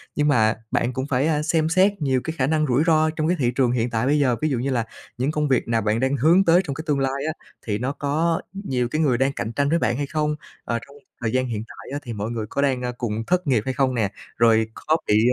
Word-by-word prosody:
Nhưng 150 Hz, 0 st, +2 dB
mà 110 Hz, -6 st, +3 dB, 0.2 s
bạn 125 Hz, +1 st, 0 dB
cũng 130 Hz, +1 st, -2 dB
phải, 135 Hz, +2 st, +1 dB
a, 150 Hz, -2 st, +1 dB
xem 160 Hz, +1 st, +1 dB
xét 190 Hz, +2 st, +3 dB
nhiều 130 Hz, -3 st, +1 dB
cái 160 Hz, -, -3 dB
khả 130 Hz, 0 st, +1 dB
năng 155 Hz, 0 st, +1 dB
rủi 130 Hz, +4 st, +2 dB
ro 155 Hz, -1 st, +4 dB
trong 155 Hz, 0 st, -2 dB
cái 180 Hz, +1 st, +1 dB
thị 120 Hz, -3 st, +2 dB
trường 125 Hz, -3 st, +2 dB
hiện 120 Hz, -1 st, 0 dB
tại 115 Hz, +1 st, -1 dB
bây 145 Hz, +2 st, +3 dB
giờ, 125 Hz, -4 st, +3 dB
ví 155 Hz, -, +1 dB
dụ 130 Hz, -4 st, -1 dB
như 135 Hz, +3 st, -1 dB
là 120 Hz, -3 st, 0 dB, 0.3 s
những 130 Hz, +5 st, 0 dB
công 150 Hz, -1 st, 0 dB
việc 130 Hz, -2 st, +1 dB
nào 115 Hz, -1 st, +1 dB
bạn 110 Hz, +2 st, 0 dB
đang 130 Hz, +2 st, +1 dB
hướng 165 Hz, +9 st, +5 dB
tới 170 Hz, +2 st, +5 dB
trong 140 Hz, -, -3 dB
cái 155 Hz, -, -6 dB
tương 145 Hz, -2 st, +1 dB
lai 135 Hz, +1 st, -1 dB
á, 160 Hz, -, -1 dB, 0.3 s
thì 105 Hz, -2 st, -1 dB
nó 125 Hz, +5 st, -2 dB
có 155 Hz, +4 st, 0 dB
nhiều 130 Hz, -, -2 dB
cái 155 Hz, +5 st, -1 dB
người 135 Hz, -6 st, +2 dB
đang 135 Hz, +2 st, +1 dB
cạnh 115 Hz, -1 st, -4 dB
tranh 140 Hz, +3 st, +1 dB
với 170 Hz, -, +2 dB
bạn 120 Hz, -, 0 dB
hay 145 Hz, -, -1 dB
không? 150 Hz, 0 st, -1 dB, 0.3 s
Ờ, 115 Hz, -, -2 dB
trong 140 Hz, -, -16 dB, 0.3 s
thời 110 Hz, -2 st, -1 dB
gian 130 Hz, 0 st, +1 dB
hiện 110 Hz, -3 st, -3 dB
tại -, -, -12 dB
á 145 Hz, -, -2 dB
thì 120 Hz, -3 st, -6 dB
mọi 105 Hz, +1 st, -4 dB
người 110 Hz, -2 st, -3 dB
có 140 Hz, -, -1 dB
đang, 130 Hz, -3 st, +1 dB
a, 125 Hz, -, -2 dB
cùng 115 Hz, -2 st, -3 dB
thất 180 Hz, -3 st, +1 dB
nghiệp 120 Hz, -6 st, +3 dB
hay 130 Hz, -, -1 dB
không 130 Hz, 0 st, +1 dB
nè? 105 Hz, -3 st, 0 dB, 0.3 s
Rồi 110 Hz, -1 st, +4 dB
có 155 Hz, +1 st, 0 dB
bị, 105 Hz, +1 st, +4 dB
135 Hz, 290 wpm, -23 LUFS, 120-155 Hz, 0.3 s, hướng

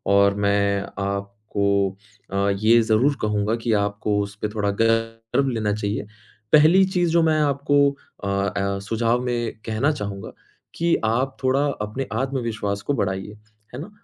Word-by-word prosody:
और 100 Hz, 0 st, +5 dB
मैं 100 Hz, 0 st, +1 dB, 0.2 s
आपको 100 Hz, 0 st, -1 dB, 0.4 s
अ, 100 Hz, +1 st, +1 dB
ये 110 Hz, +4 st, +4 dB
ज़रूर 115 Hz, +6 st, +2 dB
कहूँगा 105 Hz, +1 st, 0 dB
कि 115 Hz, -1 st, -1 dB
आपको 100 Hz, 0 st, -1 dB
उसपे 100 Hz, +1 st, -4 dB
थोड़ा 105 Hz, -2 st, 0 dB
गर्व 115 Hz, +3 st, +1 dB
लेना 110 Hz, -4 st, -1 dB
चाहिए। 105 Hz, 0 st, -3 dB, 0.5 s
पहली 160 Hz, +5 st, +7 dB
चीज़ 175 Hz, -2 st, +2 dB
जो 170 Hz, 0 st, +4 dB
मैं 155 Hz, -1 st, +2 dB
आपको 145 Hz, -1 st, +1 dB, 0.5 s
अ -, -, -2 dB
अ, 100 Hz, 0 st, -1 dB
सुझाव 115 Hz, +4 st, 0 dB
में 120 Hz, -2 st, -2 dB
कहना 115 Hz, +7 st, +1 dB
चाहूँगा 100 Hz, -9 st, -6 dB, 0.4 s
कि 170 Hz, 0 st, +2 dB
आप 125 Hz, +4 st, 0 dB
थोड़ा 135 Hz, +2 st, +2 dB, 0.2 s
अपने 110 Hz, +6 st, -4 dB
आत्मविश्वास 115 Hz, -5 st, -2 dB
को 145 Hz, -, -1 dB
बढ़ाइए। 100 Hz, -2 st, -3 dB, 0.4 s
है 125 Hz, -, -6 dB
ना? 170 Hz, -, -8 dB
110 Hz, 145 wpm, -23 LUFS, 100-130 Hz, 0.5 s, पहली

